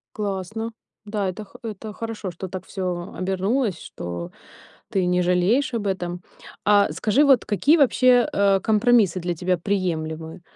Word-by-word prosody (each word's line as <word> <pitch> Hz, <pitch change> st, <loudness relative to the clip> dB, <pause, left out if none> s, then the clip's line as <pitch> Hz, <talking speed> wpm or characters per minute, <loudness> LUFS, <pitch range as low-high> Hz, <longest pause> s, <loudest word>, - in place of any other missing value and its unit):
Классно, 210 Hz, +2 st, -3 dB, 0.3 s
да, 205 Hz, -2 st, -1 dB
это 210 Hz, +4 st, -7 dB
х -, -, -16 dB
это 215 Hz, -1 st, -6 dB
хорошо, 225 Hz, -4 st, -5 dB
что 175 Hz, +2 st, -7 dB
так 185 Hz, 0 st, -6 dB
всё 180 Hz, -1 st, -4 dB
обернулось, 195 Hz, +2 st, 0 dB
что 85 Hz, 0 st, -7 dB, 0.6 s
ты 190 Hz, -2 st, +1 dB
не 180 Hz, 0 st, +2 dB
жалеешь 180 Hz, +10 st, +2 dB
об 215 Hz, -3 st, -2 dB
этом. 180 Hz, -2 st, -2 dB, 0.4 s
А 205 Hz, -5 st, +4 dB
скажи, 215 Hz, -, +2 dB
вот 270 Hz, -4 st, +5 dB
какие 245 Hz, -, +3 dB
вообще, 255 Hz, -3 st, +4 dB
а, 200 Hz, -1 st, +3 dB
компромиссы 215 Hz, -3 st, +3 dB
для 175 Hz, 0 st, -2 dB
тебя 180 Hz, +2 st, 0 dB
приемлемы, 165 Hz, -3 st, -3 dB
195 Hz, 150 wpm, -23 LUFS, 180-220 Hz, 0.6 s, вот